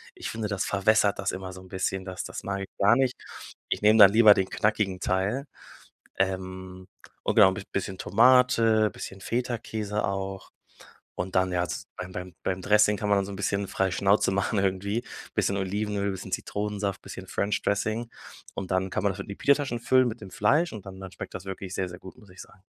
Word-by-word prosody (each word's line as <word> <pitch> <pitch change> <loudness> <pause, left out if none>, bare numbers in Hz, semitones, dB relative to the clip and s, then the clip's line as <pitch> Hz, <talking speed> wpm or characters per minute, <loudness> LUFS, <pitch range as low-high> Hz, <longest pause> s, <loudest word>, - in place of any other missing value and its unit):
Ich - - -6
finde, 110 -2 -3
das 100 -2 -1
verwässert 105 +1 +3
das 95 - 0
immer 95 0 -6
so 95 - -10
'n 95 - -14
bisschen, 95 0 -2
das 95 -1 -5
das - - -7
mag 100 0 -3
ich 95 - -6
gar 100 +4 +5
nicht. 130 0 +1 0.5
Ich - - -1
nehme 105 +1 +5
dann 100 -1 +10
lieber 110 -2 +8
den 95 - 0
knackigen 105 -3 0
Teil. 100 +9 0 0.7
Ähm, 95 -1 -3 0.4
und - - 0
genau, 95 - +7
bis 100 - -6
bisschen 95 -1 -4
Tomate, 115 -1 +4
bisschen 95 +1 -8
Feta-Käse 110 -3 -2
auch 95 0 -4 0.7
und 90 +1 -4
dann, 95 0 +2
ja, 90 0 0
z - - -5
beim 90 0 -6
beim 90 -1 -7
beim 95 -1 -2
Dressing 105 0 +4
kann 105 - -2
man 100 -1 +3
so 100 - -7
'n - - -6
bisschen 100 0 -1
frei 95 0 0
Schnauze 100 +1 +2
machen 100 +2 0
irgendwie, 100 +4 -1 0.3
bisschen 100 - +1
Olivenöl, 100 +1 -1
bisschen 95 - -7
Zitronensaft, 105 -1 -3
bisschen - - -9
French 100 +1 -1
Dressing 110 +3 -1 0.5
und 95 -1 -5
dann 95 +1 +1
kann 95 - -2
man 100 - +2
das 95 - -9
in - - -6
die 100 - -6
Pita-Taschen 140 -4 +1
füllen, 130 0 +4
mit 115 -1 -5
dem 95 - -10
Fleisch, 150 +12 +2
und 105 -3 -8
dann 95 0 -9
dann 95 -1 -8
schmeckt - - -8
das 95 - -7
wirklich 95 0 -6
sehr, 95 -1 -2
sehr 90 - -10
gut, 95 - -12
muss 105 -6 -18
ich 90 - -11
sagen. 95 - -16
100 Hz, 210 wpm, -27 LUFS, 95-105 Hz, 0.7 s, dann